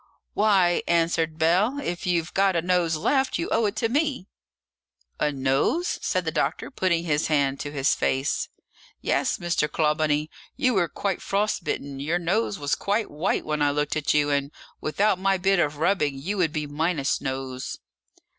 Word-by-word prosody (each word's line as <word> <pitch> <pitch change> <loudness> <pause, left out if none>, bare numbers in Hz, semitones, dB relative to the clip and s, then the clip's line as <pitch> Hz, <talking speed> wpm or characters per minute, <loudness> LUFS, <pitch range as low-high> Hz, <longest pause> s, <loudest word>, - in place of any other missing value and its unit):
"Why," 195 -5 +3
answered 165 -1 +1
Bell, 180 - +2
"if 175 -9 -4
you've 170 -2 0
got 195 -1 +3
a 170 - +2
nose 175 -2 +2
left, 265 - +1
you 340 - -2
owe 225 - +3
it 205 - -3
to 225 +1 0
me." 280 - 0 0.9
"A 150 - +1
nose?" 135 - 0
said - - -1
the - - -1
doctor, - - -1
putting 170 -8 0
his 150 -2 0
hand 140 -3 +1
to 145 - -5
his 140 -1 +2
face. 135 +2 0 0.5
"Yes, - - 0
Mr. 170 -3 -1
Clawbonny, 150 -1 +1 0.2
you 255 -1 +2
were 185 -5 +2
quite 195 -3 -2
frostbitten; 195 -9 -2
your 155 +5 0
nose 195 +5 0
was 145 -2 -1
quite 205 +2 -1
white 155 +6 -1
when 150 -1 -2
I 145 - +4
looked 150 0 -1
at 150 -2 0
you, 145 -1 +2
and 140 0 0 0.3
without 195 +5 +1
my 195 0 +2
bit 195 +1 +2
of 150 -3 0
rubbing 150 -4 +1
you 180 +10 -3
would 170 -4 +2
be 150 -1 -2
minus 150 0 -1
nose." 130 -1 -4
165 Hz, 175 wpm, -25 LUFS, 150-195 Hz, 0.9 s, I